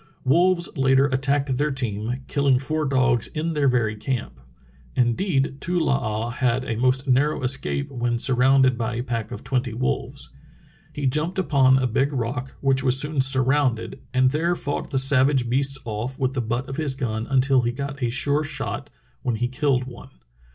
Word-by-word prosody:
Wolves 170 +5 +3
later 135 0 +3
attacked 135 0 0
their 150 +2 +1
team, 125 -1 -3
killing 140 -3 +2
four 155 +4 -2
dogs 130 -4 +2
in 160 +2 -3
their 145 -2 +1
very 120 -4 +1
camp. 110 - -4 0.6
Indeed, 135 - 0
Too 180 +1 -1
Ioo 160 - +1
ah 115 -4 -1
had 125 +1 0
a 115 - -2
most 130 +4 +1
narrow 135 +3 +2
escape 140 +2 -1
when 120 -2 -1
surrounded 130 0 +3
by 115 0 -2
a 120 - -2
pack 115 -3 -4
of - - -7
twenty 125 -3 -2
wolves. 125 +2 -3 0.6
"He 145 - -4
jumped 155 +8 -1
upon 140 -7 +4
a 130 - +1
big 135 +4 +1
rock, 130 +1 -3
which 135 -1 +2
was 130 0 +3
soon 150 -1 +1
surrounded, 130 -2 +1
and 130 0 +3
there 170 +4 0
fought 145 -3 -4
the 135 - -1
sav 135 0 +4
age 130 -4 0
beasts 135 +2 +2
off 120 +4 -4
with 130 -1 -1
the 130 - -1
butt 120 +3 -3
of 135 - -6
his 150 -4 -1
gun 115 -4 -3
until 135 0 +3
he 120 0 0
got 140 +2 -6
a 120 - +1
sure 140 +5 +1
shot, 145 - -5 0.3
when 120 -2 -1
he 120 +2 -1
killed 130 0 0
one. 125 0 -11
130 Hz, 185 wpm, -23 LUFS, 125-140 Hz, 0.6 s, upon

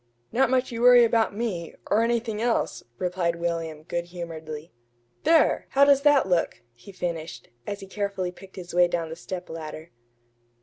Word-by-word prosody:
"Not 260 +2 +3
much 260 0 +1
you 230 0 -4
worry 245 0 +8
about 225 -2 +2
me 195 -8 -3 0.2
or 215 - +4
anything 230 -2 0
else," 235 0 0 0.2
replied 180 -2 -1
William, 165 -2 -3
good 170 +1 -3
humoredly. 165 -3 -8 0.5
"There! 325 -1 +4
how 280 +1 +6
does 280 -1 +5
that 290 -6 +4
look?" 175 -2 0
he 120 +12 -14
finished, 165 -8 -5 0.2
as 200 0 -4
he - - -7
carefully 195 -2 -3
picked 190 +1 -15
his 175 -3 -8
way 175 0 +5
down 170 -2 -2
the 160 - -6
stepladder. 165 -3 -7
180 Hz, 165 wpm, -26 LUFS, 170-230 Hz, 0.5 s, worry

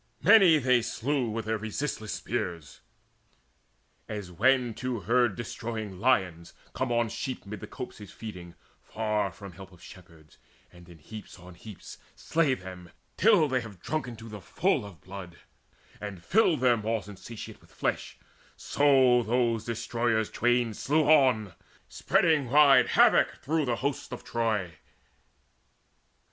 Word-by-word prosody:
Many 190 -8 +7
they 125 -3 +3
slew 125 +2 -2
with 110 0 -4
their 110 0 -1
resistless 110 0 -4
spears; 85 -4 -5 1.3
As 100 -4 -6
when 125 +5 +2
two 125 -2 -4
herd 120 +2 +2
destroying 110 -4 -6
lions 95 -8 0 0.2
come 130 -2 -2
On 120 -1 +1
sheep 125 +3 -5
amid 105 +1 -7
the - - -9
copses 105 -6 -9
feeding, 90 -6 -9 0.3
far 105 -3 -2
From 100 +1 -11
help 95 +2 -13
of 90 - -18
shepherds, 85 -5 -16 0.3
and 85 0 -16
in 85 - -14
heaps 105 +7 -11
on 90 +1 -13
heaps 105 +2 -12 0.2
Slay 155 -5 +1
them, 90 -4 -11 0.3
till 195 -6 +4
they 130 -2 0
have 105 -6 -11
drunken 135 - -4
to 115 +1 -11
the 105 -2 -9
full 140 - 0
Of 90 -6 -15
blood, 95 -3 -10 0.6
and 100 -4 -8
filled 180 - +2
their 125 -2 +4
maws 110 -1 -3
insatiate 105 +3 -10
With - - -22
flesh, - - -3 0.4
so 130 -4 +3
those 115 -1 0
destroyers 115 -1 -1
twain 120 -1 +1
slew 150 +8 +1
on, 130 - +4 0.3
Spreading 165 -8 +1
wide 145 0 +6
havoc - - +4
through 155 +1 0
the 120 -2 0
hosts 140 -2 -3
of 125 - -7
Troy. 105 -9 -2
115 Hz, 140 wpm, -28 LUFS, 100-130 Hz, 1.3 s, Many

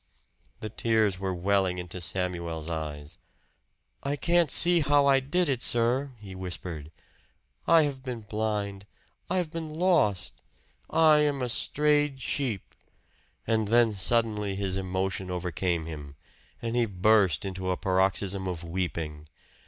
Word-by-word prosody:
The 110 - -4
tears 110 -3 +1
were 95 -1 -2
welling 95 0 0
into 90 0 -7
Samuel's 85 -3 -4
eyes. 75 0 -5 0.8
"I 140 +1 -2
can't 170 +1 +2
see 175 +5 +7
how 145 -1 +3
I 135 -1 +5
did 175 +7 0
it, 130 -4 -1
sir," 120 +5 +2
he 100 -2 -10
whispered. 85 -4 -6 0.8
"I 165 -1 +6
have 140 -3 -3
been 125 -3 -6
blind 105 -2 -3 0.4
I 185 - 0
have 175 -4 -1
been 165 -1 -5
lost. 130 - +1 0.6
I 160 -2 +5
am 145 -3 +1
a 125 - -2
strayed 150 +2 +2
sheep!" 130 -7 -3 0.7
And 110 -2 +1
then 115 +1 +4
suddenly 105 -1 0
his 95 -1 -2
emotion 95 0 -2
overcame 90 -1 -2
him, 75 -3 -8 0.5
and 115 0 -2
he 120 -1 +2
burst 100 -1 +2
into 95 -1 -4
a 90 - 0
paroxysm 95 0 0
of 90 -2 -4
weeping. 80 -3 -4
100 Hz, 135 wpm, -27 LUFS, 90-130 Hz, 0.8 s, see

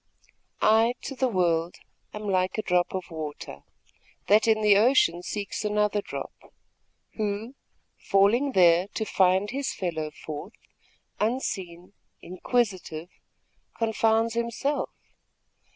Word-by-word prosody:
I, 225 +3 +4
to 270 - -5
the 260 0 +1
world, 175 -5 0 0.4
am 210 - -7
like 185 -2 0
a 215 - -1
drop 180 0 +1
of 185 -2 -5
water, 150 - -7 0.7
That 210 +2 +4
in 220 -1 +3
the 210 -1 +5
ocean 205 -6 +4
seeks 200 +3 -4
another 210 0 +1
drop, - - -7 0.8
Who, 215 +3 -3 0.5
falling 230 +8 +2
there 175 -1 +5
to 220 - -1
find 190 +1 +2
his 275 +1 -3
fellow 160 -4 -3
forth, 150 +6 -8 0.7
Unseen, 190 -6 -3 0.3
inquisitive, 185 -4 -2 0.7
confounds 225 0 +1
himself. 235 +5 -2
205 Hz, 110 wpm, -26 LUFS, 180-225 Hz, 0.8 s, the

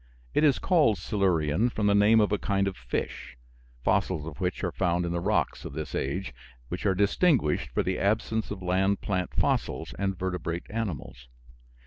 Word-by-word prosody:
It - - +2
is 145 -4 +5
called 150 - +3
Silurian, 90 0 +1
from 110 -3 -2
the 100 - +4
name 105 +2 +5
of 105 - +1
a 105 - +1
kind 100 -1 0
of 95 - -3
fish, - - -5 0.5
fossils 95 -4 +1
of 80 -1 -8
which 90 +2 -2
are 90 - 0
found 90 -1 0
in 85 - -2
the 85 - -1
rocks 85 -4 0
of - - -7
this 75 -2 -5
age, 90 +4 -2 0.4
which - - -2
are 95 - +2
distinguished 105 - +2
for - - 0
the 95 0 -1
absence 110 +2 0
of 95 -2 -6
land 95 +2 +1
plant 90 -2 -1
fossils - - 0
and 95 -1 -1
vertebrate 90 -2 -3
animals. 80 - -5
95 Hz, 180 wpm, -27 LUFS, 85-105 Hz, 0.5 s, is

